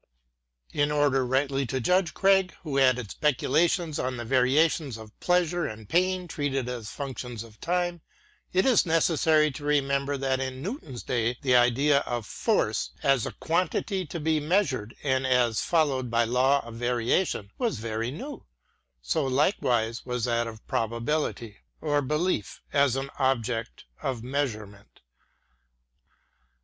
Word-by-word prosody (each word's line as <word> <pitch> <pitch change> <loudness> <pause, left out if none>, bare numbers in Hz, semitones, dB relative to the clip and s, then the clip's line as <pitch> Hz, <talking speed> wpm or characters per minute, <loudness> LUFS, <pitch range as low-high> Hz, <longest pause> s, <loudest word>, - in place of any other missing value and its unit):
In 145 0 +2
order 145 -3 +2
rightly 135 +2 0
to 130 +2 -2
judge 180 +7 +1
Craig, 190 -1 +3
who 140 -4 -1
added 125 -5 +2
speculations 155 +3 +1
on 125 0 -2
the 120 - -5
variations 135 +2 +2
of 110 -1 -11
pleasure 175 -1 +1
and 110 -1 -9
pain 185 - +1
treated 140 -5 -2
as 120 -4 -5
functions 125 -4 -6
of 110 -2 -16
time, 175 -1 -1 0.5
it 185 +1 +2
is 255 -4 +5
necessary 160 -2 +3
to 145 +2 -9
remember 140 -1 +1
that 135 -1 0
in 130 -1 -4
Newton's 165 - -6
day 120 -1 -1
the 130 -2 +3
idea 130 +4 +4
of 120 -5 -4
force, - - 0
as 135 -4 +3
a - - -4
quantity 185 +3 -1
to 170 - -5
be 155 0 +1
measured, 145 - 0
and 130 -2 +1
as 125 -3 +2
following 140 -7 +1
a 115 0 +3
law 130 +4 +2
of 120 - -9
variation, 120 - 0
was 235 - 0
very 110 +1 -3
new: 260 - -7 0.6
so 155 - 0
likewise 125 - +1
was 125 -2 -3
that 120 -1 0
of 110 -1 -10
probability, 115 -1 -2 0.2
or 145 -1 +1
belief, 150 - -1
as 140 -3 +3
an 135 +1 -3
object 120 -3 -1 0.2
of 125 -4 -3
measurement. 110 -7 -4
135 Hz, 140 wpm, -27 LUFS, 120-155 Hz, 0.6 s, is